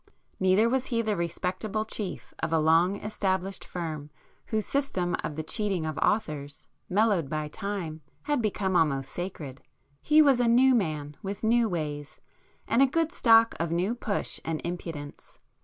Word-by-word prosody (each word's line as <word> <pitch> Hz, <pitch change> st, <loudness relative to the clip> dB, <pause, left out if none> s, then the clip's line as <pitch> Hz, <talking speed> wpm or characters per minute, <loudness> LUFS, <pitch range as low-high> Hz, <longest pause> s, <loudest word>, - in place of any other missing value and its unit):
Neither 190 Hz, +4 st, +4 dB
was 260 Hz, +2 st, 0 dB
he 230 Hz, -2 st, 0 dB
the 215 Hz, -2 st, 0 dB
respectable 185 Hz, +5 st, -2 dB
chief 205 Hz, -4 st, -6 dB
of 160 Hz, -, -2 dB
a 165 Hz, -, +3 dB
long 165 Hz, +4 st, +4 dB
established 195 Hz, -2 st, -2 dB
firm 155 Hz, -4 st, -5 dB, 0.4 s
whose 215 Hz, -2 st, -1 dB
system 190 Hz, -11 st, 0 dB
of 150 Hz, -, -4 dB
the 155 Hz, -, -3 dB
cheating 195 Hz, -1 st, -1 dB
of 155 Hz, -2 st, -3 dB
authors, 150 Hz, -9 st, -1 dB, 0.2 s
mellowed 200 Hz, -6 st, +2 dB
by 155 Hz, 0 st, -3 dB
time, 190 Hz, -5 st, -5 dB, 0.2 s
had 290 Hz, -3 st, 0 dB
become 195 Hz, -3 st, -1 dB
almost 140 Hz, -5 st, +1 dB
sacred;—he 155 Hz, -, -3 dB
was 275 Hz, -4 st, +4 dB
a 245 Hz, -, +3 dB
'new' 255 Hz, +3 st, +5 dB
man, 155 Hz, -, -1 dB
with 200 Hz, +2 st, -5 dB
new 230 Hz, 0 st, +3 dB
ways, 150 Hz, -4 st, -4 dB, 0.5 s
and 235 Hz, -, +3 dB
a 275 Hz, -, +7 dB
good 325 Hz, +4 st, 0 dB
stock 230 Hz, -8 st, +5 dB
of 165 Hz, 0 st, -1 dB
new 180 Hz, +6 st, +1 dB
push 220 Hz, -4 st, -3 dB
and 160 Hz, -1 st, -2 dB
impudence. 165 Hz, -4 st, -7 dB
185 Hz, 155 wpm, -28 LUFS, 160-220 Hz, 0.5 s, a